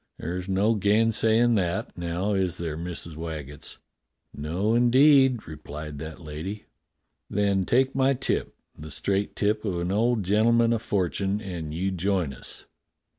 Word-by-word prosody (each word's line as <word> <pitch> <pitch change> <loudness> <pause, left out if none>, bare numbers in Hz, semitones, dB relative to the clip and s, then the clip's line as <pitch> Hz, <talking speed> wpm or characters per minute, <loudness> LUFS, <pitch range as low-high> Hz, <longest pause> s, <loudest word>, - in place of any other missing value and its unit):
There's 90 +3 -4
no 100 +4 +3
gainsay 110 +2 +3
in' 120 0 +4
that, 90 -5 -1
now, 85 +4 -2
is 95 -2 0
there. 80 -3 -3
Missus 85 -1 -6
Waggetts.?" 75 -3 -7 0.6
"No, 85 +9 -1
indeed," 130 +1 +5
replied 75 -1 -8
that 80 0 -7
lady. 85 +6 -6 0.6
"Then 100 -2 +1
take 130 +5 +2
my 135 +1 +3
tip, 130 - -2 0.2
the 80 +1 -9
straight 100 +6 -1
tip 105 +1 0
of 95 -5 -2
an 85 +1 -2
old 115 +1 +2
gentle 105 +5 +3
man 115 0 +4
o' 115 - 0
fortune, 100 -1 -1
and 90 -7 -6
you 90 +5 -1
join 90 -5 0
us." - - -8
95 Hz, 150 wpm, -26 LUFS, 85-110 Hz, 0.6 s, indeed